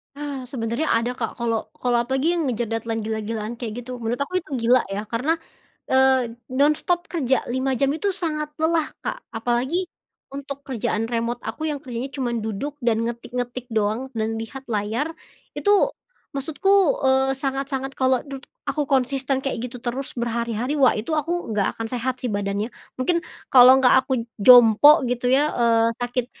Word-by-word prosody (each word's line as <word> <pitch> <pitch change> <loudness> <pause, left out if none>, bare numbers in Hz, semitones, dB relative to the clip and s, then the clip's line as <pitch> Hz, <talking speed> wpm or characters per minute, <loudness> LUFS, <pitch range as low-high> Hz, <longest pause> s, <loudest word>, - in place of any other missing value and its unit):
Ah, 280 -3 -5
sebenarnya 240 +3 -2
ada, 235 +2 0
Kak, 240 -2 -4
kalau 230 -2 -2
kalau 245 -1 0
apalagi 265 +8 0
yang 310 - 0
ngejer 235 -2 -2
deadline 225 -1 -2
gila-gilaan 220 +1 -3
kayak 235 0 -5
gitu, 250 0 -7
menurut 230 +1 -1
aku 365 +5 -1
itu - - -17 0.2
gila 250 +2 +5
ya, 200 +2 -4
karena, 265 +8 +1 0.6
eee, 260 -2 +4 0.2
nonstop 300 +6 +1
kerja 265 -8 +1
5 260 +1 0
jam 275 +3 +1
itu 375 +6 -1
sangat 305 -5 -2
lelah, 320 0 0
Kak, - - -5
apalagi 245 +10 0 0.5
untuk 280 0 -7
kerjaan 225 -4 -2
remote 235 0 -2
aku 310 +8 -4
yang 295 -1 -4
kerjanya 250 0 -4
cuman 240 -3 -1
duduk 220 +7 -4
dan 230 -2 +1
ngetik-ngetik 245 +1 -4
doang, 220 +3 -1
dan 225 0 -2
lihat 225 +4 -7
layar, 220 +9 -1 0.4
itu 410 -1 +3 0.4
maksudku, 290 +7 -1 0.3
eee, 265 0 +3
sangat-sangat 270 0 -3
kalau 260 -1 +3
dud 275 -1 -8 0.2
aku 290 0 -1
konsisten 270 0 +1
kayak 270 -4 -2
gitu 245 - -9
terus 255 +2 -3
berhari-hari, 235 +2 -2
wah, 260 - +6
itu 215 +9 -4
aku 330 -3 -1
nggak 205 -2 0
akan 225 - -3
sehat 255 +1 -2
sih - - 0
badannya. 205 +3 -2 0.3
Mungkin 335 +7 +1 0.3
kalau 255 0 +9
nggak 260 -1 +5
aku 255 -4 -1 0.2
jompo 245 +6 +8
gitu 245 0 -1
ya, 290 +3 +3
eee, 230 -1 +3
sakit 245 0 -1
255 Hz, 165 wpm, -23 LUFS, 230-275 Hz, 0.6 s, kalau